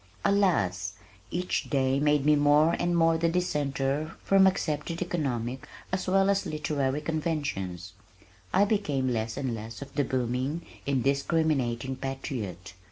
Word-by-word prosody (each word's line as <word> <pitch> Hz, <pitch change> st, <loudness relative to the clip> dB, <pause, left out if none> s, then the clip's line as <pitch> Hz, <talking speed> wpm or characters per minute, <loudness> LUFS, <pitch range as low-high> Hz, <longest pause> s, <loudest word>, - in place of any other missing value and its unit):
Alas! 100 Hz, -, +2 dB, 0.4 s
Each 180 Hz, +1 st, -2 dB
day 135 Hz, -1 st, +2 dB
made 150 Hz, -1 st, +2 dB
me 150 Hz, 0 st, +6 dB
more 150 Hz, +3 st, +4 dB
and 175 Hz, 0 st, +1 dB
more 165 Hz, -1 st, +4 dB
the 165 Hz, 0 st, +2 dB
dissenter 150 Hz, -3 st, -1 dB
from 195 Hz, -1 st, +5 dB
accepted 165 Hz, -2 st, -1 dB
economic 135 Hz, -8 st, -2 dB, 0.2 s
as 185 Hz, 0 st, -2 dB
well 195 Hz, +1 st, +4 dB
as 200 Hz, 0 st, 0 dB
literary 150 Hz, -2 st, -1 dB
conventions. 145 Hz, -, -3 dB, 0.6 s
I 200 Hz, -, +4 dB
became 150 Hz, -12 st, 0 dB
less 115 Hz, -1 st, -2 dB
and 135 Hz, -3 st, -2 dB
less 110 Hz, 0 st, -7 dB
of 140 Hz, -, -15 dB
the 145 Hz, -, +1 dB
booming, 130 Hz, +5 st, -2 dB, 0.2 s
indiscriminating 135 Hz, -2 st, +1 dB
patriot. 110 Hz, -, -5 dB
145 Hz, 130 wpm, -28 LUFS, 130-165 Hz, 0.6 s, me